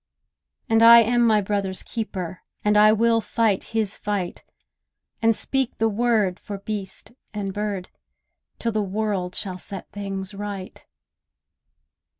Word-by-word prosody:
And 225 -2 +3
I 235 0 +10
am 240 +2 +2
my 215 -2 +4
brother's 195 -1 -1
keeper, 185 -6 -5 0.2
And 210 0 +3
I 210 +1 +7
will 230 +1 +3
fight 220 -4 0
his 220 -3 -2
fight, 200 -4 -3 0.8
And 225 0 +4
speak 265 +1 -1
the 225 - +2
word 215 -4 +1
for 205 - -7
beast 200 0 -6 0.2
and 195 -2 -3
bird, 205 -3 -3 0.7
Till 230 - -1
the 215 -1 0
world 195 -2 -2
shall 185 -2 -3
set 195 0 -8
things 195 -1 -5
right. 200 -2 -7
210 Hz, 135 wpm, -23 LUFS, 195-225 Hz, 0.8 s, I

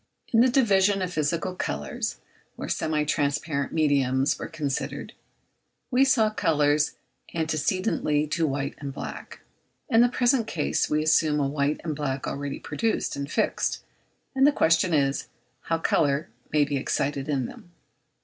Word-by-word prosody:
In 225 - +6
the 255 - +5
division 205 -6 +3
of 180 -1 -4
physical 165 +4 -1
colours, 75 - -3 0.4
where - - -6
semi 155 -1 0
transparent 145 -1 -1
mediums 140 -4 +2
were - - -4
considered, 150 -4 -4 0.8
we 255 +2 +5
saw 225 -5 +3
colours 150 -5 +2 0.4
antecedently 160 -1 0
to 160 +1 0
white 140 0 -2
and 140 -1 -5
black. 135 - -8 0.5
In 230 -3 +5
the 245 - +5
present 245 -1 +2
case 155 -7 0
we 155 0 +1
assume 155 -1 +3
a 140 - +1
white 140 +1 0
and 155 -3 -3
black 140 -2 -3
already 140 0 -4
produced 225 -1 -2
and 140 +1 -5
fixed; - - 0 0.5
and 270 +1 +5
the - - +6
question 165 - +3
is, 140 -1 +1 0.4
how 165 - +1
colour 150 -2 +1 0.2
can 150 -1 +3
be 145 0 -2
excited 140 +1 -1
in 135 -4 0
them? 175 - -11
155 Hz, 150 wpm, -26 LUFS, 140-185 Hz, 0.8 s, In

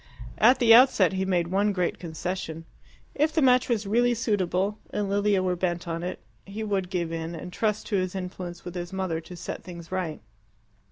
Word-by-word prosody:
At 255 - +6
the 235 -3 +6
outset 230 -7 +6
he 190 0 -1
made 175 -3 +1
one 200 +3 +2
great 180 -2 -1
concession. 165 -1 -5 0.5
If 305 +2 +2
the 315 - +1
match 255 -1 +4
was 220 -3 0
really 240 +4 +2
suitable, 205 -3 0
and 205 -1 -2
Lilia 200 -1 +2
were 180 -1 +1
bent 175 -1 -2
on 165 0 -3
it, 180 +1 -4 0.3
he 205 +3 -6
would 195 -4 -1
give 175 -3 -2
in, 165 +1 -4
and 180 +2 -8
trust 215 -1 -1
to 205 - +1
his 185 0 -2
influence 180 -2 -6
with 175 - -6
his 175 -1 -5
mother 185 -4 -2
to 170 +2 -11
set 175 - -6
things 170 -2 -10
right. 180 -4 -2
185 Hz, 200 wpm, -26 LUFS, 175-210 Hz, 0.5 s, At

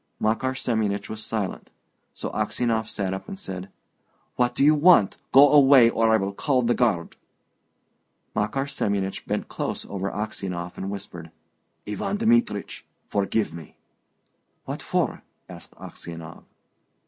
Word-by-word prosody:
Makar 130 +4 0
Semyonich 105 -5 -1
was 110 0 -5
silent. 110 -4 -3 0.4
So - - -5
Aksionov 115 -2 -1
sat 95 -2 -2
up 95 - -6
and 195 - -7
said, 95 - -6 0.7
"What 120 0 +1
do - - +2
you 150 +2 +7
want? 150 - +5
Go 140 +1 +8
away, 135 -5 +7
or 115 -1 +2
I 110 - +5
will 100 -1 -2
call 130 +3 +1
the 120 +1 +2
guard!" 105 -10 0 1.2
Makar 105 +6 0
Semyonich 100 -8 -2
bent - - -2
close - - -4
over 100 0 -3
Aksionov, 95 -4 -4
and 95 - -5
whispered, 90 -5 -7 0.6
"Ivan 195 - -2
Dmitrich, 230 - +1 0.3
forgive 100 -1 0
me!" 85 -2 -11 0.9
"What - - -5
for?" - - -1 0.3
asked - - -11
Aksionov. 85 -2 -9
110 Hz, 135 wpm, -25 LUFS, 95-130 Hz, 1.2 s, Go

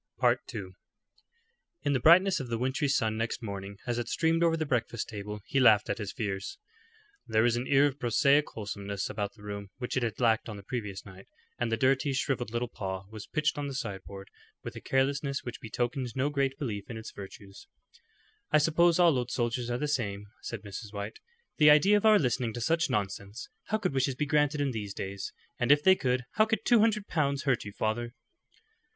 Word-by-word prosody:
II. 100 -4 0 1.1
In 145 - +1
the 130 - +2
brightness 180 +7 +6
of 130 - -5
the 115 -1 -2
wintry 130 +4 0
sun 110 -5 +1
next 115 +2 -2
morning 100 -1 -6
as 120 -1 -1
it 120 - -3
streamed 165 +4 +1
over 165 -1 +3
the 155 - -1
breakfast 120 -4 -1
table 105 -1 -6
he 135 - 0
laughed 110 -5 +5
at - - -3
his 105 -2 -4
fears. 105 - -4 0.7
There 110 0 +3
was 120 -1 +3
an 120 +2 -2
air 140 +1 +5
of 145 -1 -1
prosaic 140 +4 +3
wholesomeness 100 -2 -4
about 100 -1 -3
the 105 - -16
room 100 -1 -6
which 125 - -4
it 130 - +1
had 115 -2 -2
lacked 115 -2 +2
on 105 - -6
the 100 - -11
previous 105 -4 -5
night, 95 -1 -13 0.3
and 120 -1 -1
the 115 - +1
dirty, 135 +3 +2
shrivelled 130 -2 -1
little 120 +2 -2
paw 95 -3 -5
was 110 -2 -8
pitched 155 -1 0
on 145 - -2
the 135 - -5
sideboard 100 -4 -6 0.3
with - - -7
a - - -7
carelessness 140 +1 0
which 120 - -7
betokened 120 +2 -3
no 135 +3 0
great 135 -2 0
belief 105 -8 -4
in 115 - -5
its 110 - -8
virtues. 100 0 -11 0.8
"I 155 - +6
suppose 165 +2 +4
all 170 -4 +5
old 125 0 -3
soldiers 120 0 -1
are 120 - 0
the 150 - -2
same," 105 -8 -2 0.2
said 115 -3 -6
Mrs. 100 +1 -8
White. 100 +1 -6 0.4
"The 150 -2 +7
idea 170 +8 +6
of 210 +1 +3
our 215 -1 +7
listening 125 - 0
to 120 - -5
such 165 +7 +1
nonsense! 100 +2 -3 0.2
How 215 - 0
could 210 - -2
wishes 135 0 +1
be 150 - -1
granted 150 0 +2
in 140 -2 +1
these 105 -4 -5
days? 95 0 -5 0.3
And 125 +2 +3
if 145 0 +5
they 190 - +7
could, 125 -7 0
how 215 - +6
could 220 -1 -1
two 240 -2 +5
hundred 210 -2 +2
pounds 140 -3 0
hurt 130 -6 +1
you, 105 - -6
father?" 115 +4 -2
120 Hz, 210 wpm, -29 LUFS, 105-145 Hz, 1.1 s, The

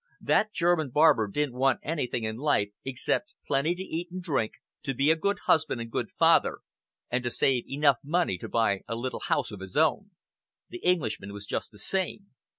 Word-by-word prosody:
That 215 - +2
German 170 -5 +1
barber 145 -5 +4
didn't 145 +5 -1
want 135 -1 +3
anything 135 -7 -2
in 110 0 -3
life 135 -7 +1
except 135 +9 -1
plenty 145 +5 +1
to 185 - -5
eat 175 -1 -4
and 185 +1 -6
drink, 140 -11 -1 0.3
to 135 -3 -2
be 140 +5 +4
a - - +4
good 200 +5 0
husband 155 -6 +2
and 115 0 -6
good - - -2
father, - - +3 0.5
and 125 0 0
to 120 - 0
save 125 0 +1
enough 140 -2 +3
money 155 - 0
to - - -7
buy 105 -4 +1
a 115 - -3
little 125 +3 -4
house 135 -5 -1
of 105 - -8
his 95 -1 -7
own. 160 +6 +2 0.6
The 360 - -7
Englishman 140 - 0
was 100 0 -8
just - - -4
the 105 - -16
same. 190 - -3
140 Hz, 195 wpm, -28 LUFS, 115-165 Hz, 0.6 s, barber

